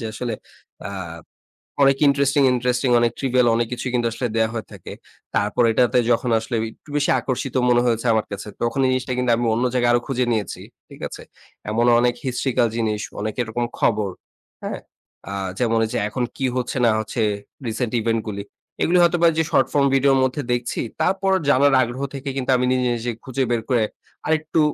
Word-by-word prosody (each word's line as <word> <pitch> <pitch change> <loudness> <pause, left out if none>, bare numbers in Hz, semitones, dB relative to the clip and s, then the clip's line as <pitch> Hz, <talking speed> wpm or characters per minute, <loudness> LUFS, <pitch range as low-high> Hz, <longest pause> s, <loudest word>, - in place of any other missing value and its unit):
যে - - -6
আসলে 120 +1 -4 0.6
আ - - -6 0.9
অনেক 135 0 +5
ইন্টারেস্টিং, 140 0 +3
ইন্টারেস্টিং 125 +1 0
অনেক 120 -1 +2
trivial 125 -2 +2
অনেক 120 0 0
কিছুই 125 +1 -3
কিন্তু 120 -1 +1
আসলে 120 +2 -2
দেয়া 110 0 +2
হয়ে 115 -2 -4
থাকে। - - -9 0.4
তারপর 105 +4 +1
এটাতে 125 +2 +2
যখন 120 +1 +1
আসলে 115 +2 -4 0.2
একটু 150 - -21
বেশি 140 - +1
আকর্ষিত 130 +1 -3
মনে 120 0 +4
হয়েছে 115 0 0
আমার 110 -1 +1
কাছে, 100 +1 -6
তখন 120 +3 -1
এই - - +3
জিনিসটা 130 0 -1
কিন্তু 125 -1 +1
আমি 120 - -1
অন্য 115 +3 0
জায়গায় 120 -1 +3
আরো 120 - +4
খুঁজে 130 -2 0
নিয়েছি, 110 -5 -2 0.3
ঠিক - - -13
আছে? - - -10 0.5
এমন 115 +3 +1
অনেক 120 0 +2
historical 125 -1 +1
জিনিস, 110 -2 -1 0.2
অনেক 110 +1 -2
এরকম 120 +1 -2
খবর, 105 -3 +1 0.5
হ্যাঁ? - - -4 0.5
আ - - -4 0.3
যেমন 115 -2 +2
এইযে 110 - -3
এখন 125 +3 -2
কি 135 - -1
হচ্ছে 125 +1 -2
না 115 - +5
হচ্ছে 110 +2 -3 0.5
রিসেন্ট 115 +1 -2
ইভেন্ট 115 0 0
গুলি। 100 -1 -4 0.4
এগুলি 180 +2 +3
হয়তো 175 0 +3
বা - - +8
যে 160 - +3
শর্ট - - +3
ফর্ম 140 -1 +4
ভিডিও'র 135 0 +4
মধ্যে 130 +3 0
দেখছি, 120 0 -2 0.2
তারপর 195 0 +1 0.2
জানার 140 +1 +4
আগ্রহ 125 +2 -3
থেকে 140 0 -5
কিন্তু 130 0 0
আমি 125 - +1
নিজে, 125 -1 +1
নিজে 120 +1 -3
খুঁজে 130 +1 -2
বের 115 -1 +1
করে 120 -4 +3 0.4
আরেকটু 155 0 0
125 Hz, 190 wpm, -22 LUFS, 115-135 Hz, 0.9 s, বা